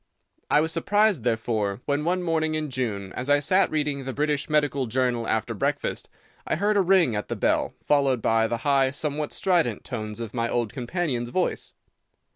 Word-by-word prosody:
I 150 Hz, -, +5 dB
was 160 Hz, +1 st, -1 dB
surprised, 205 Hz, -, +2 dB
therefore, 110 Hz, -3 st, -1 dB
when, 145 Hz, +1 st, 0 dB
one 180 Hz, +2 st, 0 dB
morning 160 Hz, -2 st, 0 dB
in 155 Hz, -2 st, -3 dB
June, 105 Hz, -7 st, -3 dB
as 130 Hz, +2 st, -4 dB
I 145 Hz, 0 st, +5 dB
sat 185 Hz, +6 st, +3 dB
reading 145 Hz, -3 st, -1 dB
the 130 Hz, 0 st, -4 dB
British 150 Hz, +1 st, -1 dB
Medical 145 Hz, -4 st, +1 dB
Journal 120 Hz, -1 st, 0 dB
after 110 Hz, -, 0 dB
breakfast, -, -, -2 dB, 0.4 s
I -, -, +1 dB
heard 205 Hz, +5 st, +1 dB
a 200 Hz, -, +4 dB
ring 180 Hz, -, +3 dB
at 105 Hz, -, -3 dB
the -, -, -3 dB
bell, -, -, 0 dB
followed 140 Hz, -4 st, +3 dB
by 115 Hz, 0 st, +2 dB
the 115 Hz, -, -2 dB
high, 135 Hz, -2 st, +3 dB
somewhat 150 Hz, +1 st, -3 dB
strident 180 Hz, -4 st, +1 dB
tones 110 Hz, -3 st, -5 dB
of 115 Hz, -2 st, -6 dB
my 115 Hz, -1 st, -1 dB
old 120 Hz, -3 st, -1 dB
companion's 125 Hz, -2 st, -2 dB
voice. 185 Hz, +8 st, -2 dB
140 Hz, 185 wpm, -25 LUFS, 120-160 Hz, 0.4 s, I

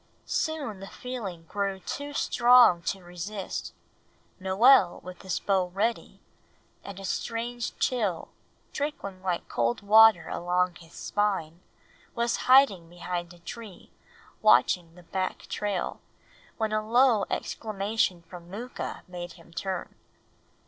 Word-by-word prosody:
Soon 285 Hz, -11 st, -2 dB
the 195 Hz, -, -8 dB
feeling 210 Hz, -11 st, -6 dB
grew 195 Hz, +2 st, -2 dB
too 285 Hz, +9 st, -5 dB
strong 245 Hz, -9 st, +5 dB
to 190 Hz, +2 st, -3 dB
resist. 180 Hz, +3 st, -5 dB, 0.7 s
Noel 190 Hz, +4 st, +5 dB
with 180 Hz, 0 st, -9 dB
his 190 Hz, -3 st, -2 dB
bow 190 Hz, -2 st, +1 dB
ready, 210 Hz, +6 st, -2 dB, 0.6 s
and 200 Hz, -1 st, -8 dB
a 195 Hz, -, -7 dB
strange 235 Hz, +4 st, -3 dB
chill 210 Hz, -10 st, 0 dB, 0.4 s
trickling 280 Hz, -11 st, -4 dB
like 180 Hz, -2 st, -2 dB
cold 120 Hz, 0 st, 0 dB
water 215 Hz, -3 st, +7 dB
along 180 Hz, +1 st, 0 dB
his 170 Hz, -1 st, -16 dB
spine, 190 Hz, -5 st, -1 dB, 0.5 s
was 235 Hz, 0 st, +1 dB
hiding 230 Hz, -11 st, +6 dB
behind 175 Hz, 0 st, -5 dB
a 175 Hz, -, -14 dB
tree 210 Hz, +2 st, -10 dB, 0.5 s
watching 175 Hz, -5 st, +4 dB
the 180 Hz, -, -15 dB
back 185 Hz, +2 st, -3 dB
trail, 205 Hz, -3 st, -3 dB, 0.6 s
when 220 Hz, -1 st, -1 dB
a 215 Hz, -, +1 dB
low 230 Hz, -1 st, +4 dB
exclamation 205 Hz, -4 st, -1 dB
from 170 Hz, 0 st, -12 dB
Mooka 235 Hz, +6 st, -6 dB
made 175 Hz, -1 st, -7 dB
him 170 Hz, -1 st, -18 dB
turn. 190 Hz, 0 st, -4 dB
195 Hz, 120 wpm, -28 LUFS, 175-225 Hz, 0.7 s, water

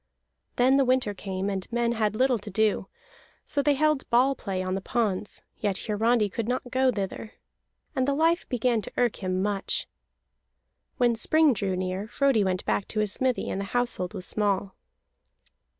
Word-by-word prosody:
Then 260 Hz, +2 st, +4 dB
the 275 Hz, -, +4 dB
winter 255 Hz, -5 st, +1 dB
came, 190 Hz, 0 st, -4 dB
and 195 Hz, 0 st, -4 dB
men 235 Hz, 0 st, +1 dB
had 215 Hz, -3 st, 0 dB
little 255 Hz, 0 st, +2 dB
to 205 Hz, -, -8 dB
do, 210 Hz, -1 st, +1 dB, 0.6 s
so 285 Hz, -, +1 dB
they 290 Hz, 0 st, +3 dB
held 305 Hz, 0 st, +1 dB
ball 255 Hz, +3 st, +4 dB
play 195 Hz, -7 st, -4 dB
on 185 Hz, 0 st, -2 dB
the 195 Hz, -, -2 dB
ponds; 210 Hz, -2 st, -2 dB, 0.2 s
yet 200 Hz, -3 st, 0 dB
Hiarandi 220 Hz, +1 st, +2 dB
could 220 Hz, +3 st, -4 dB
not 250 Hz, 0 st, -2 dB
go 260 Hz, 0 st, +3 dB
thither. 200 Hz, +1 st, -5 dB, 0.6 s
And 260 Hz, -1 st, +1 dB
the 280 Hz, -, +1 dB
life 330 Hz, +3 st, +1 dB
began 245 Hz, -2 st, +1 dB
to -, -, -8 dB
irk 245 Hz, -3 st, +1 dB
him 185 Hz, -1 st, -1 dB
much. 200 Hz, -1 st, -1 dB, 1.1 s
When 240 Hz, -2 st, +3 dB
spring 310 Hz, +5 st, +4 dB
drew 195 Hz, -3 st, -2 dB
near, 185 Hz, +2 st, -3 dB
Frodi 260 Hz, -1 st, +2 dB
went 185 Hz, -1 st, -1 dB
back 200 Hz, -, 0 dB
to 215 Hz, -, -3 dB
his 210 Hz, -1 st, +2 dB
smithy, 260 Hz, -2 st, +1 dB
and 195 Hz, -, -2 dB
the -, -, -3 dB
household 220 Hz, -5 st, -1 dB
was 185 Hz, -2 st, -4 dB
small. 200 Hz, -2 st, -1 dB
220 Hz, 180 wpm, -26 LUFS, 195-255 Hz, 1.1 s, Then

